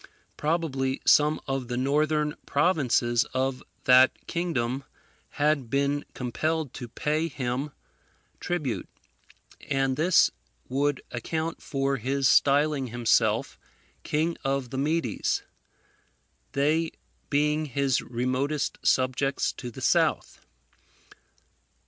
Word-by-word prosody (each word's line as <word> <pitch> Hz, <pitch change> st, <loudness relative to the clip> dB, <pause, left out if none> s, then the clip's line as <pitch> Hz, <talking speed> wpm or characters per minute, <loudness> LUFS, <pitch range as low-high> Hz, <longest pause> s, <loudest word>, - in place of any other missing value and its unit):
Probably 145 Hz, -4 st, -1 dB
some 150 Hz, +1 st, +5 dB
of 135 Hz, -2 st, -2 dB
the 120 Hz, 0 st, -3 dB
northern 150 Hz, +3 st, +1 dB
provinces 130 Hz, -7 st, +2 dB
of 130 Hz, 0 st, 0 dB, 0.2 s
that 130 Hz, 0 st, +5 dB
kingdom 135 Hz, -7 st, -2 dB, 0.5 s
had 145 Hz, -4 st, +1 dB
been 140 Hz, +2 st, 0 dB
compelled 155 Hz, +4 st, -2 dB
to 120 Hz, -, -7 dB
pay 155 Hz, +7 st, -1 dB
him 130 Hz, -1 st, -3 dB, 0.7 s
tribute; 155 Hz, -9 st, -3 dB, 0.8 s
and 135 Hz, -2 st, +1 dB
this 170 Hz, +3 st, +4 dB, 0.4 s
would 140 Hz, +1 st, 0 dB
account 160 Hz, +7 st, -3 dB
for 135 Hz, -1 st, -1 dB
his 135 Hz, +3 st, 0 dB
styling 145 Hz, 0 st, +3 dB
himself 120 Hz, 0 st, +1 dB, 0.4 s
King 160 Hz, +3 st, -1 dB
of 135 Hz, -2 st, -1 dB
the 130 Hz, -, -3 dB
Medes, 150 Hz, -5 st, 0 dB, 1.1 s
they 155 Hz, +4 st, +1 dB, 0.4 s
being 150 Hz, +2 st, +1 dB
his 135 Hz, -1 st, +1 dB
remotest 130 Hz, +4 st, -2 dB
subjects 130 Hz, +1 st, +1 dB
to 125 Hz, -, -7 dB
the 120 Hz, -, -10 dB
south. -, -, +1 dB
140 Hz, 100 wpm, -27 LUFS, 130-150 Hz, 1.1 s, some